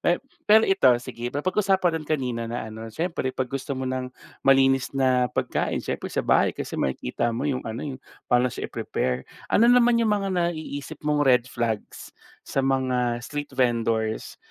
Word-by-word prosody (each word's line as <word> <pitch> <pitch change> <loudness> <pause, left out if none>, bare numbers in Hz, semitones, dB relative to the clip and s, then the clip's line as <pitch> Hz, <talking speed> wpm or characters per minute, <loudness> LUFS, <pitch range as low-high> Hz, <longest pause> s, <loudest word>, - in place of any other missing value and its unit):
Me 175 - +2 0.3
pero 220 +1 +7
ito, 165 -9 +5
sige 120 0 -6
papag 180 +10 0
usapan 180 -5 +2
rin - - -14
kanina 125 -6 -1
na 120 -1 -4
ano, 110 +1 -8
siyempre 165 0 -2
'pag 130 0 -2
gusto 135 0 -3
mo 130 - -3
ng 130 0 -3 0.3
malinis 135 -1 +4
na 130 -2 +3
pagkain - - -1
siyempre - - -4
sa - - -2
bahay, - - +4
kasi - - -5
makikita 65 - -1
mo 120 - -3
'yung 130 -2 -1
ano, 110 +2 -5
'yung 130 - -12 0.3
paano 125 0 +3
siya - - -5
i-prepare. 65 +1 -2 0.3
Ano 235 +3 +5
naman 240 -1 +5
'yung 225 -2 +2
mga 200 -2 0
naiisip 160 -4 -3
mong 150 -1 +2
red 125 -2 +4
flags 115 -3 -4 0.3
sa 135 - -1
mga 125 -3 +1
street 145 +2 -5
vendors, 115 -3 0
130 Hz, 175 wpm, -25 LUFS, 120-160 Hz, 0.3 s, pero